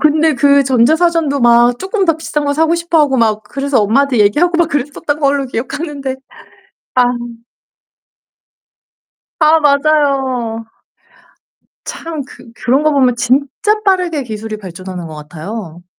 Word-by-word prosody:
근데 310 0 +3
그 280 +2 +4
전자사전도 290 +3 +2
막 240 0 +4
조금 385 +1 -1
더 330 -3 +2
비싼 300 -2 -3
거 285 - 0
사고 320 +3 +1
싶어하고 320 -5 +1
막 215 -3 +1
그래서 275 +2 -1
엄마한테 250 +4 +1
얘기하고 315 +13 +2
막 340 -1 +2
그랬었던 290 +1 -3
걸로 280 -2 +1
기억하는데 270 +2 -5 0.8
아. 250 - +5 2.4
아 315 +1 +5
맞아요. 275 -6 +1 1.2
참 320 -4 -6
그 230 - -15
그런 260 +5 0
거 310 - +3
보면 255 -4 +2
진짜 280 - 0
빠르게 360 -7 +1
기술이 215 -1 -6
발전하는 185 -2 -8
것 155 - -9
같아요. 170 +3 -8
275 Hz, 275 characters per minute, -15 LUFS, 235-310 Hz, 2.4 s, 아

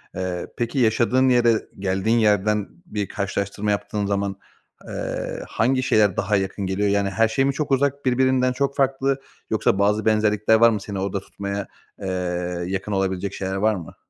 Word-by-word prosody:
Eee, 90 -1 -3
peki 120 +3 -1
yaşadığın 125 +3 +3
yere, 120 -2 +4 0.3
geldiğin 95 +4 +1
yerden 105 -1 +2 0.2
bir 105 - -3
karşılaştırma 100 +1 -2
yaptığın 105 0 -2
zaman, 100 -1 -1 0.5
eee, - - -4
hangi 130 +3 +1
şeyler 105 -5 +3
daha 100 +2 +1
yakın 95 +1 -2
geliyor? 95 +2 0
Yani, 100 0 +1
her 110 +4 +2
şey 135 +5 +1
mi 140 - +1
çok 150 0 -3
uzak, 140 +1 +1
birbirinden 130 0 +2
çok 140 +1 -1
farklı, 135 0 +1 0.3
yoksa 95 - +1
bazı 105 +2 +2
benzerlikler 110 0 +3
var 115 +1 +6
mı? 105 -3 -1
Seni 100 -2 -5
orada 100 +1 -2
tutmaya, 100 +1 -5 0.3
eee, 95 - -4 0.6
yakın 95 +2 -3
olabilecek 95 0 -1
şeyler 95 0 -3
var 105 +2 +2
mı? 85 -4 -9
105 Hz, 165 wpm, -23 LUFS, 100-125 Hz, 0.6 s, var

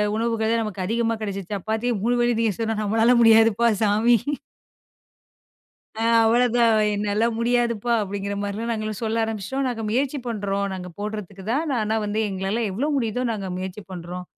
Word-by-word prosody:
உணவுகள் 225 -1 0
தான் 230 0 +2
நமக்கு 195 -3 -4
அதிகமா 230 +2 0
கிடைச்சுச்சு, 200 -1 -4
சப்பாத்தி 220 +5 -2
3 245 +1 +2
வேளயும் 240 -1 +2
திங்க 220 -3 +1
சொன்னா, 225 -1 -1
நம்மால 225 +4 +3
முடியாதுப்பா 225 0 +5 0.2
சாமி. 215 +3 +4 1.8
அ - - -3 0.2
அவ்வளவுதான். 235 0 +3 0.2
என்னால 210 +2 +1
முடியாதுப்பா! 235 -1 +1
அப்படிங்கற 200 0 -3
மாதிரி 205 +3 -3
நாங்கலாம் 215 -2 -3
சொல்ல 225 +1 0
ஆரம்பிச்சிட்டோம். 225 +5 -3
நாங்க 225 -3 -3
முயற்சி 270 +5 0
பண்றோம். 200 -3 -1
நாங்க 180 -1 -6
போடுறதுக்கு 205 -2 -6
தான். 295 0 0
ஆனா 215 +1 0
வந்து 210 +2 -1
எங்களால 195 +4 -2
எவ்வளவு 285 +10 -1
முடியுதோ 245 0 -1
நாங்க 195 -4 -4
முயற்சி 190 +2 -6
பண்றோம். 180 0 -7
220 Hz, 150 wpm, -23 LUFS, 200-235 Hz, 1.8 s, முடியாதுப்பா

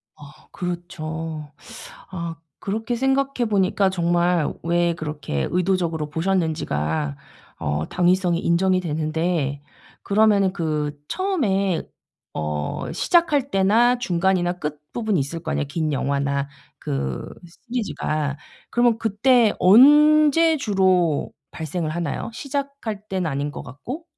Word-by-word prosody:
아 145 0 -15
그렇죠. 165 -4 -5 0.6
아 170 -3 -5 0.2
그렇게 225 +4 -3
생각해 270 -2 +1
보니까 195 -1 +2
정말 175 -2 +1
왜 170 0 +1
그렇게 150 - -3
의도적으로 175 -4 0
보셨는지가 145 - -1 0.4
어 75 +2 -2
당위성이 180 -1 +2
인정이 185 +2 +2
되는데 155 -2 -1 0.4
그러면은 200 -2 +3
그 150 -4 -2
처음에 200 - 0 0.5
어 75 -1 -3
시작할 295 -6 +2
때나 225 +6 +3
중간이나 180 -3 +1
끝부분이 155 +7 -3
있을 160 +5 -4
거 160 - -3
아니에요 145 - -1
긴 155 0 -1
영화나 140 +1 -1 0.3
그 70 -1 -3 0.4
시리즈가. 155 - -2 0.3
그러면 240 -1 +3
그때 225 +1 +3
언제 300 - +6
주로 185 - +1 0.2
발생을 160 0 -4
하나요? 170 +5 -3
시작할 275 -6 -4
때는 185 -4 -1
아닌 140 +2 -2
것 145 - -7
같고? 255 - -8
175 Hz, 260 characters per minute, -22 LUFS, 155-215 Hz, 0.6 s, 언제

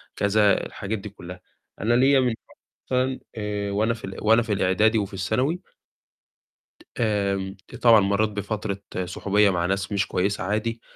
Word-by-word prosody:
كذا، 100 0 +3
الحاجات 105 +1 -5
دي 105 - -8
كُلّها. 90 -2 -11 0.4
أنا 115 +3 +2
ليّا 135 +2 +5
من 125 -3 +1 0.5
مثلًا 130 0 0 0.2
آآ، 105 -1 -3
وأنا 110 +3 +1
في 115 - -8
ال 95 - -8
وأنا 110 +2 +5
في 110 -2 -2
الإعدادي 105 +4 +2
وفي 100 -1 -2
الثانوي 125 - -1 1.4
آمم 100 -3 0 0.2
آآ، - - -7
طبعًا 115 -3 +7
مرّيت 100 +2 +1
بفترة 100 -1 -3 0.3
صُحوبية 100 +3 +2
مع 85 -2 0
ناس 95 +2 -1
مش 100 0 0
كويسة 100 +3 -1
عادي، 110 +3 -2
105 Hz, 155 wpm, -24 LUFS, 100-110 Hz, 1.4 s, طبعًا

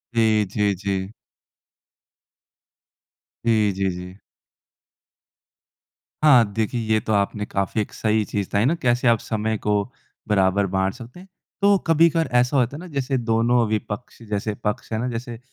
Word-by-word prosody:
जी, 110 -2 +3
जी, 105 +1 0
जी। 95 +1 -3 2.3
जी, 110 -3 +3
जी, 95 0 -1
जी। 90 +2 -9 2.0
हाँ, 125 -7 +7
देखिए 110 +2 -1
ये 110 - +3
तो 110 - -2
आपने 105 +1 0
काफ़ी 100 +2 -1
एक - - -6
सही 110 0 +1
चीज़ 100 -2 -3
बताई 105 +3 +1
ना 155 - +3
कैसे 120 0 +2
आप 115 -1 +4
समय 110 0 -2
को 105 -1 0 0.4
बराबर 100 -1 +2
बाँट 95 0 +1
सकते 125 +6 -12
हैं, 190 - -14 0.3
तो 200 0 +5
कभी-कभार 165 0 +3
ऐसा 125 +3 +1
होता 125 +2 +1
है - - -7
ना 180 - -9
जैसे 135 -3 -2
दोनों 115 +1 +2
विपक्ष 110 +2 -4
जैसे 105 +1 -2
पक्ष 105 +3 -3
है 110 - -1
ना, 125 - -2
जैसे 120 0 -6
110 Hz, 150 wpm, -22 LUFS, 105-125 Hz, 2.3 s, हाँ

